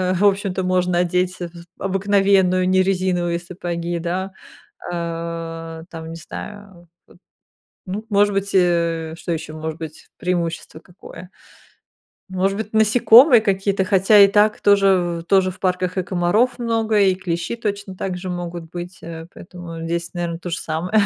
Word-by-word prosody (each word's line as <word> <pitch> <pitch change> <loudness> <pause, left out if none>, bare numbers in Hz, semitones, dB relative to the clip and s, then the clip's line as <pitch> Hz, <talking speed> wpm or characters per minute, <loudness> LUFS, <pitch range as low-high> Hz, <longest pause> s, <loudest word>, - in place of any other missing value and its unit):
э, 185 0 +1
в 185 +3 0
общем-то 195 -2 +1
можно 180 -1 +1
одеть 180 +1 0
з 170 -1 -8
обыкновенную, 195 -1 +2
не 185 0 +4
резиновые 180 -2 0
сапоги, 175 -1 -4
да. 185 +3 -3 0.6
Э, 165 -1 -5
там, 160 -1 -8
не 165 - -7
знаю, 205 +4 -9
вот, 175 0 -19 1.0
ну, 200 +3 -5
может 205 0 +3
быть, 195 0 -1
э, 170 -3 +1
что 175 - -5
еще 155 -1 -5
может 155 0 -5
быть, 160 -2 -9
преимущество 170 -3 -3
какое, 180 +1 -13 1.0
может 190 +1 0
быть, 220 0 -5
насекомые 230 +4 +6
какие-то, 195 -2 0
хотя 195 +2 +5
и 200 - +9
так 210 +1 +3
тоже-тоже 185 -2 +3
в 185 - -16
парках 185 0 -1
и 185 - +1
комаров 190 +8 +1
много, 225 -2 +1
и 190 -2 +4
клещи 180 +3 -3
точно 205 -4 -4
также 185 0 -4
могут 175 -2 -5
быть, 175 +1 -8
э, 165 0 -8
поэтому 175 -2 -9
здесь 170 0 -3
наверно 170 -2 -3
то 175 - -6
же 170 - -2
самое. 165 +3 -4
180 Hz, 150 wpm, -21 LUFS, 170-195 Hz, 1.0 s, и